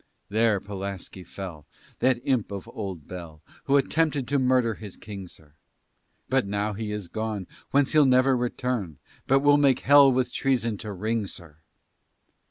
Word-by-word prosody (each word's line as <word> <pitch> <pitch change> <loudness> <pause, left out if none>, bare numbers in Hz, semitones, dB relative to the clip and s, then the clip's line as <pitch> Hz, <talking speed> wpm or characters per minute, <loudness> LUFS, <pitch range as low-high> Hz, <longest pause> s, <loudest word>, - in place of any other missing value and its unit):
There 110 0 +3
Pulaski 100 -2 -6
fell, 90 -4 -8 0.3
That 130 -1 +2
imp 130 -8 0
of 100 -2 -6
old 95 -8 -6
Bell, 85 -4 -9 0.2
Who 140 0 +4
attempted 145 -1 +1
to 140 0 +2
murder 125 -3 +2
his 105 -3 -10
king, 100 -3 -8
sir. 75 -3 -17 0.7
But 130 -5 +1
now 105 +1 -1
he 105 +1 -4
is 105 -3 -4
gone 110 -1 -4 0.2
Whence 140 -1 +2
he'll 150 -3 +5
never 130 +1 +4
return; 120 - -2 0.3
But 135 +1 +4
will 145 0 +5
make 140 -3 +3
hell 140 0 +7
with 130 -1 0
treason 120 -5 0
to 105 - -6
ring, 110 +2 -2
sir. 85 -5 -10
110 Hz, 160 wpm, -26 LUFS, 100-130 Hz, 0.7 s, hell